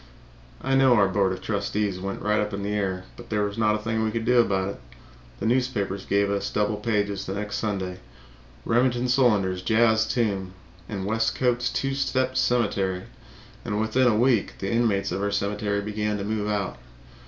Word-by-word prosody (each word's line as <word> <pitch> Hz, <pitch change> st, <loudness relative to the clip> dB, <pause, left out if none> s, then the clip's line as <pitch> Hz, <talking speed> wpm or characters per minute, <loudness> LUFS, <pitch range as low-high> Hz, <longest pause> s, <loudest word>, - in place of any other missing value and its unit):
I 135 Hz, -, 0 dB
know 135 Hz, -2 st, +5 dB
our 100 Hz, -4 st, +4 dB
board 95 Hz, 0 st, +1 dB
of 95 Hz, -, -5 dB
trustees 100 Hz, -2 st, -1 dB
went 95 Hz, +1 st, -5 dB
right 105 Hz, +1 st, +2 dB
up 105 Hz, -1 st, -1 dB
in 100 Hz, -, -5 dB
the 100 Hz, -, -2 dB
air, 95 Hz, -3 st, -2 dB
but 120 Hz, -, -12 dB
there 105 Hz, -1 st, +1 dB
was 100 Hz, 0 st, -2 dB
not 110 Hz, -1 st, +2 dB
a -, -, 0 dB
thing 110 Hz, +1 st, -2 dB
we 110 Hz, -, +1 dB
could 115 Hz, 0 st, -3 dB
do 125 Hz, 0 st, +4 dB
about 95 Hz, -4 st, +2 dB
it. 100 Hz, -, -8 dB, 0.6 s
The -, -, -3 dB
newspapers 110 Hz, -5 st, 0 dB
gave 100 Hz, 0 st, +2 dB
us 100 Hz, 0 st, -1 dB
double 105 Hz, 0 st, 0 dB
pages 105 Hz, -2 st, -1 dB
the 95 Hz, -, -3 dB
next 105 Hz, 0 st, -3 dB
Sunday 95 Hz, -4 st, -3 dB, 0.7 s
"Remington 120 Hz, +1 st, +2 dB
Solander's 105 Hz, -8 st, +2 dB
Jazz 110 Hz, +2 st, +3 dB
Tomb" 100 Hz, -6 st, -1 dB, 0.3 s
and 95 Hz, -2 st, -4 dB
"Westcote's 115 Hz, +3 st, +1 dB
Two 135 Hz, 0 st, -1 dB
Step 130 Hz, -1 st, 0 dB
Cemetery." 100 Hz, -7 st, +1 dB, 0.6 s
And 105 Hz, -, -2 dB
within 110 Hz, +4 st, +2 dB
a 110 Hz, -3 st, +3 dB
week 120 Hz, -3 st, +2 dB
the 95 Hz, -, -3 dB
inmates 115 Hz, -4 st, +1 dB
of 95 Hz, -, -2 dB
our 100 Hz, -, 0 dB
cemetery 100 Hz, 0 st, -1 dB
began 105 Hz, 0 st, -2 dB
to 100 Hz, -, -4 dB
move 105 Hz, 0 st, -2 dB
out. 100 Hz, -9 st, -2 dB
105 Hz, 190 wpm, -25 LUFS, 100-115 Hz, 0.7 s, know